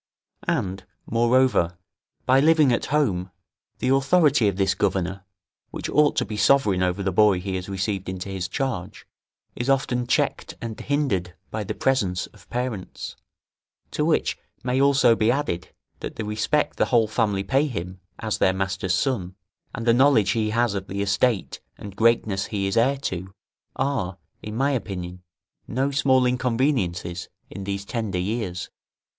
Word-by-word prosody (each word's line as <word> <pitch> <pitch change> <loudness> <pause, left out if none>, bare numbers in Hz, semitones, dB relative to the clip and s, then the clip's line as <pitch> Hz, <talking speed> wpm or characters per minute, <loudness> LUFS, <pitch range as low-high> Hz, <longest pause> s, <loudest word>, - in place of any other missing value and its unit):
And, 100 - -1 0.2
moreover, 120 -6 +2 0.5
by 130 +1 +5
living 155 -3 +5
at - - 0
home, 105 -12 +1 0.5
the 125 - -1
authority 135 -2 +4
of 100 - 0
this 95 0 +2
governor, 95 -1 -1 0.4
which - - -5
ought 150 0 +4
to - - +1
be 105 - -5
sovereign 105 -3 +3
over 90 +2 0
the 95 - 0
boy 100 -1 +4
he 95 +1 -4
has 95 +1 -4
received 95 0 -2
into 95 0 -5
his 95 -2 -3
charge, 115 -6 -4 0.5
is 120 +2 -3
often 125 -3 +1
checked - - 0
and 115 -2 -6
hindered 105 - -1 0.2
by 110 0 -2
the 105 +2 -4
presence 100 -9 +1
of 100 -3 -19
parents; 120 -6 -4 0.8
to - - -1
which - - +1 0.2
may 130 +1 +1
also 135 -4 +5
be 110 0 +2
added, 130 -9 -1 0.3
that - - -6
the 110 - -4
respect 110 +8 0
the - - +3
whole 115 -3 +3
family 105 -2 0
pay 135 +9 +2
him, 90 - -5 0.2
as 110 -2 -2
their 95 - +4
master's 95 -1 -1
son, 95 -8 -1 0.4
and 115 - -5
the 115 - +5
knowledge 125 -5 +4
he 110 -2 0
has 115 0 +1
of 95 -1 -4
the 100 +1 -2
estate 100 +1 +1 0.2
and 100 -2 -9
greatness 110 -3 +2
he 100 -2 -2
is 95 - -1
heir 130 +5 +3
to, 95 -8 -4 0.4
are, 130 -10 -1 0.2
in 105 0 -6
my 135 +4 +2
opinion, 90 -8 -4 0.5
no 135 +4 0
small 135 -3 +3
inconveniences 115 - 0 0.2
in 95 +1 -7
these 100 0 -3
tender 110 -6 -3
years. 90 -2 -3
110 Hz, 160 wpm, -24 LUFS, 95-130 Hz, 0.8 s, by